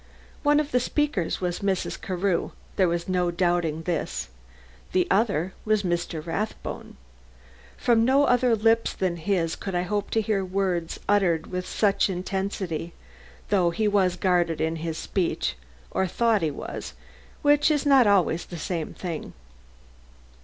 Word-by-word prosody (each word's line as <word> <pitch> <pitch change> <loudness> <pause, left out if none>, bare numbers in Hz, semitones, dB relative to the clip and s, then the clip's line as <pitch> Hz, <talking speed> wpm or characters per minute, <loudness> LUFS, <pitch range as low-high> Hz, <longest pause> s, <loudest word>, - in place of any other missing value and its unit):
One 295 0 +4
of 300 -1 -2
the 250 - +3
speakers 255 - -1
was 180 -1 -1
Mrs. 195 -2 -1
Carew 185 -1 -1 0.2
there 185 - +3
was 170 0 -1
no 180 -1 +1
doubting 175 -2 0
this 175 - -2 0.6
the 185 -1 +3
other 190 -4 +1
was 215 -1 +1
Mr. 175 -3 -2
Rathbone. 200 - -4 0.8
From 230 -2 +3
no 265 +4 +4
other 245 -2 +3
lips 225 +1 +2
than 180 -2 -1
his 165 -1 0
could 195 -2 -5
I 175 - +1
hope 205 +2 -2
to 225 - +1
hear 205 -2 0
words 185 -3 -1
uttered 180 -6 +2
with 180 0 -3
such 200 -1 +2
intensity, 185 -3 -3 0.6
though 185 -4 +3
he 215 +5 0
was 190 -3 +2
guarded 175 -3 +1
in 160 +1 0
his 160 0 -4
speech, 180 - -1 0.4
or 190 - +1
thought 225 +2 +2
he 160 - +1
was, 145 - -6 0.5
which 290 +1 +5
is 295 -2 +1
not 270 -5 +6
always 180 -4 +2
the 175 - -7
same 165 -1 -4
thing. 170 -4 -5
185 Hz, 150 wpm, -25 LUFS, 170-215 Hz, 0.8 s, not